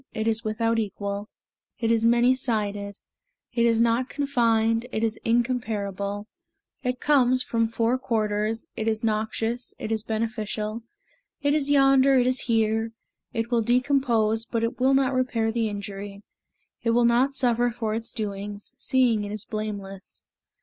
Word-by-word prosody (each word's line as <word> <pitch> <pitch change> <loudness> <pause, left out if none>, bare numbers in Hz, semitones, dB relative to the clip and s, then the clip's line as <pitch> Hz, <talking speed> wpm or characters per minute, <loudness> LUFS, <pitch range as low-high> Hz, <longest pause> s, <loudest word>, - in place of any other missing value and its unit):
It 220 0 -1
is 225 0 +1
without 225 +1 0
equal, 200 0 -4 0.5
It 230 -1 0
is 230 0 +2
many 240 +2 +5
sided; 210 -5 -2 0.6
It 235 -1 +3
is 230 -1 +3
not 235 +2 +2
confined, 230 -5 +1
It 220 - -2
is 225 -1 0
incomparable; 215 -4 -1 0.6
It 250 -1 -2
comes 255 -3 +3
from 230 -1 0
four 230 +2 0
quarters; 215 -2 -1
It 220 - -3
is 220 0 0
noxious, 225 +2 -1
it 215 - -5
is 220 -1 0
beneficial; 220 0 -3 0.6
It 285 0 +3
is 295 -2 +1
yonder, 275 -1 +5
it 245 - +3
is 255 0 +2
here; 225 0 +1 0.4
It 230 0 -3
will 235 -1 +3
decompose, 240 -3 +2
But 230 -1 -1
it 235 +2 -2
will 265 +2 +4
not 270 0 +2
repair 245 -3 0
the 225 -1 0
injury; 200 0 -7 0.6
It 230 - 0
will 240 0 +4
not 250 +4 +3
suffer 245 -2 +2
for 225 -2 -3
its 225 +1 -3
doings, 205 -1 -5
Seeing 245 -5 +2
it 205 - -5
is 215 0 -5
blameless. 200 -3 -6
230 Hz, 155 wpm, -25 LUFS, 215-245 Hz, 0.6 s, many